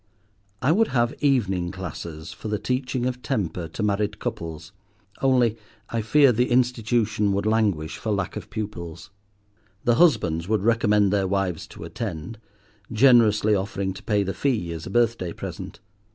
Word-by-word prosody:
I 135 - +4
would 220 +6 +3
have 120 -2 +1
evening 95 -11 +1
classes 85 -3 -7
for - - -8
the 105 0 -1
teaching 125 +1 -2
of 125 0 -2
temper 90 -6 -2
to 85 +7 -5
married 105 0 0
couples, 85 -9 -5 0.5
only 125 -4 +3 0.3
I 115 - 0
fear 140 +5 +5
the 125 +2 +1
institution 115 -4 +1
would 100 +1 -1
languish 105 -8 +1
for 110 - -3
lack 100 -3 -2
of - - -7
pupils. 85 -5 -6 0.7
The 120 -1 +3
husbands 90 - +3
would 110 -2 +1
recommend 105 -3 +3
their 100 -2 +1
wives 95 -3 -1
to - - -11
attend, 105 0 -6 0.5
generously 110 -3 +5
offering 95 -1 -1
to - - -10
pay 105 -2 +1
the 95 0 -3
fee 110 -12 -1
as 80 -1 -7
a - - -5
birthday 115 -5 +1
present. - - -7
105 Hz, 155 wpm, -24 LUFS, 95-120 Hz, 0.7 s, fear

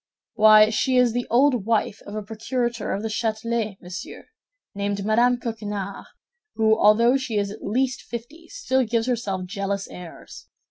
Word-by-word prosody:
"Why, 215 0 +6
she 255 +4 +1
is 245 -2 +4
the 245 0 -2
old 245 -3 +3
wife 220 -2 0
of 205 - -7
a 215 - -4
procurator* 225 +2 -3
of 200 - -3
the - - -1
Châtelet, 220 -1 -2
monsieur, 180 +1 -9 0.4
named 200 0 -3
Madame 240 +3 +3
Coquenard, 210 -4 -5 0.5
who, 220 -1 +3
although 230 +4 +4
she 255 -5 -3
is 200 -1 -1
at 210 - -10
least 255 +5 -1
fifty, 260 +9 -9
still 265 - 0
gives 230 -1 0
herself 205 -7 -2
jealous 200 0 -3
airs. 175 -2 -11
220 Hz, 155 wpm, -23 LUFS, 205-240 Hz, 0.5 s, Why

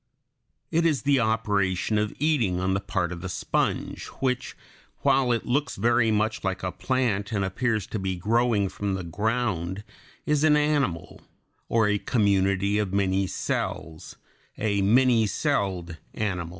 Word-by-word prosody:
It 165 +1 +2
is 155 -5 +1
the 140 -1 +3
operation 105 -3 +1
of 105 0 -1
eating 130 - +1
on 95 +1 0
the 95 - +1
part 90 -3 -2
of 85 -1 -6
the 90 - -5
sponge, - - -2
which, 130 -1 -2 0.4
while 135 -2 +3
it 115 -2 0
looks 140 +1 0
very 115 +2 +2
much 110 +1 0
like 95 -1 -2
a 90 - -1
plant 120 -6 -1
and 100 -3 0
appears 110 +2 -1
to 110 - -4
be 95 -1 -2
growing 110 +2 +1
from 100 +1 -3
the 95 - -4
ground, 100 0 -2 0.4
is 150 -1 +1
an 150 -1 +5
animal, 145 - 0 0.5
or 115 -2 +3
a 105 0 +1
community 100 -2 +1
of 105 -3 -1
many 95 -1 +1
cells 80 -2 -4 0.4
a 100 -2 0
many 115 +2 +4
celled 95 - -1 0.2
animal. 90 -6 -2
105 Hz, 150 wpm, -26 LUFS, 95-125 Hz, 0.5 s, an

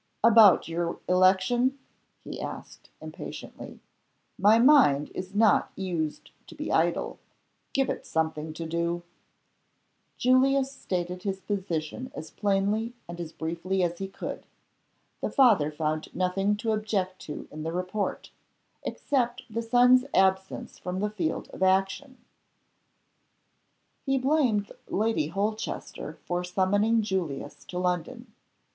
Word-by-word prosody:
"About 225 -4 +7
your 170 +1 -2
election?" 190 +9 +3 0.5
he - - -7
asked, - - -8
impatiently. - - -9 0.5
"My 210 +3 +5
mind 235 - +5
is 185 +2 -6
not 215 -2 +4
used 170 -5 -3 0.2
to - - -12
be - - -4
idle. - - +1 0.5
Give 270 -1 +1
it - - -4
something 160 -1 -1
to 165 +1 -6
do." 170 +1 -1 1.1
Julius 265 +2 +3
stated 180 -7 -4
his 195 -1 -3
position 190 +4 -3
as 160 - -7
plainly 205 +3 0
and 170 0 -6
as 165 -2 -6
briefly 170 +4 -2
as 175 0 -1
he 195 - -3
could. 195 - -7 0.7
The - - -1
father 215 - +4
found 155 0 -3
nothing 195 +3 +1
to 220 +1 -1
object 205 -4 -1
to 150 - -6
in 155 - -7
the 160 +1 -3
report 185 +4 -3 0.5
except 250 -3 -1
the 230 +2 -2
son's 250 +2 +5
absence 190 0 +1
from 180 +1 -4
the 210 +1 -1
field 175 -7 -2
of - - -11
action. 195 +8 +1 1.9
He 270 -1 +1
blamed 255 -7 +1 0.2
Lady 215 -7 0
Holchester 205 +6 -3
for 175 0 -1
summoning 205 +5 +2
Julius 180 -9 -3
to 180 - -7
London. 180 +7 -2
195 Hz, 125 wpm, -27 LUFS, 175-225 Hz, 1.9 s, About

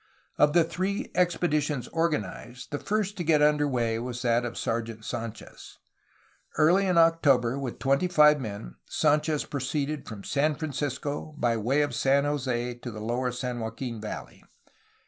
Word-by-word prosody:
Of 150 0 +5
the 170 -1 +5
three 185 +5 -3
expeditions 155 -6 +1
organized, 125 - -3
the 145 - -2
first 210 -1 -1
to 175 - -2
get 155 -2 +3
under 150 -1 +3
way 115 -4 0
was 125 +1 -5
that 120 0 +2
of 120 - -5
Sergeant 115 -1 -3
Sdnchez. 115 0 -7 0.8
Early 175 +6 +4
in 180 -2 +2
October, 140 -7 +4
with 130 -4 -4
twenty 140 +6 +1
five 150 -3 +5
men, 100 - -7
Sd,nchez 150 0 +1
proceeded 145 +1 -3
from 105 -3 -8
San 150 +1 +1
Francisco 145 0 -4
by 120 -4 +1
way 130 +7 +1
of 145 -4 -3
San 135 +3 +3
Jose 125 -4 -1
to 120 - -6
the 110 -2 -7
lower 120 +3 -1
San 125 0 -4
Joaquin 115 0 -5
valley. 105 - -7
140 Hz, 155 wpm, -27 LUFS, 120-155 Hz, 0.8 s, Of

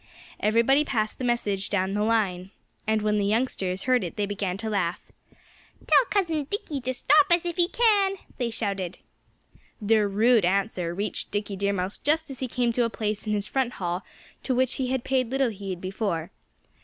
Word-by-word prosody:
Everybody 230 +7 +3
passed 215 -7 -2
the - - -4
message 210 -5 0
down 190 -1 0
the 205 - 0
line. 200 -5 0 0.4
And 220 -1 +1
when 210 0 +2
the - - +1
youngsters 200 -5 0
heard 255 -3 +2
it 175 - -5
they 205 - 0
began 200 -2 -3
to 220 +2 -5
laugh. 180 -5 0 0.9
"Tell - - +5
Cousin 330 -7 0
Dickie 315 - -4
to 255 +1 -2
stop 390 +8 +4
us 345 0 +3
if 345 -1 -2
he 345 -1 +4
can," 405 -3 +3 0.2
they 240 -2 0
shouted. 195 -5 -3 0.8
Their 215 -1 +3
rude 220 +2 +4
answer 180 -2 0
reached 205 +3 -2
Dickie 205 0 -3
Deer 200 +1 0
Mouse 185 +1 -2
just 310 0 0
as 260 - -8
he 260 - -2
came 240 -1 0
to 245 - +2
a 230 - +1
place 215 -1 -3
in 210 - +1
his 205 0 -1
front 260 -2 -1
hall 175 0 -3 0.4
to 260 - -1
which 260 0 +1
he 255 - 0
had 260 -1 -1
paid 260 -3 0
little 265 -2 +1
heed 195 -3 -6
before. 185 -3 -3
220 Hz, 190 wpm, -26 LUFS, 200-260 Hz, 0.9 s, Tell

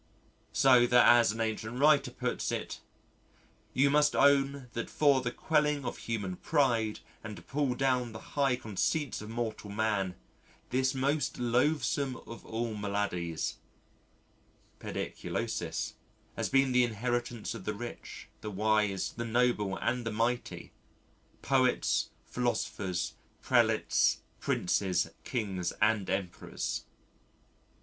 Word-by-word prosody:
So 125 -2 +5
that 120 0 +6
as 120 -2 +6
an 115 - -6
ancient 110 +1 -2
writer 150 0 +5
puts - - -2
it, - - -4 0.9
"you 140 +2 +3
must 150 0 +4
own 140 -1 +3
that 115 - -4
for 140 -3 +3
the 125 - -1
quelling 150 +1 +1
of 120 - -4
human 100 -6 -3
pride 120 -8 +1 0.2
and 105 -2 -6
to - - -12
pull 140 -3 -1
down 125 -3 +1
the 110 - -10
high 140 -3 +2
conceits 125 - -1
of 105 - -8
mortal 115 -2 -4
man, 100 -3 0 0.6
this 130 +1 +1
most 140 +2 0
loathesome 130 +2 +1
of 115 -3 -10
all 115 0 -2
maladies 100 -5 -2 1.2
(Pediculosis) - - -3 0.4
has - - -2
been 135 -1 +3
the 125 0 +5
inheritance 120 0 -2
of 110 -5 -8
the 105 - -2
rich, 120 +3 -8
the 105 - -5
wise, 105 -1 +1
the 115 - -4
noble 115 -4 +1
and 120 +3 -1
the 115 - -3
mighty 115 +3 -2 0.7
poets, 130 -2 +2 0.2
philosophers, 105 -7 -2 0.3
prelates, - - +3 0.2
princes, 90 0 0
Kings 95 -8 -2
and 105 -3 +2
Emperors." 95 -2 -3
120 Hz, 120 wpm, -31 LUFS, 105-130 Hz, 1.2 s, that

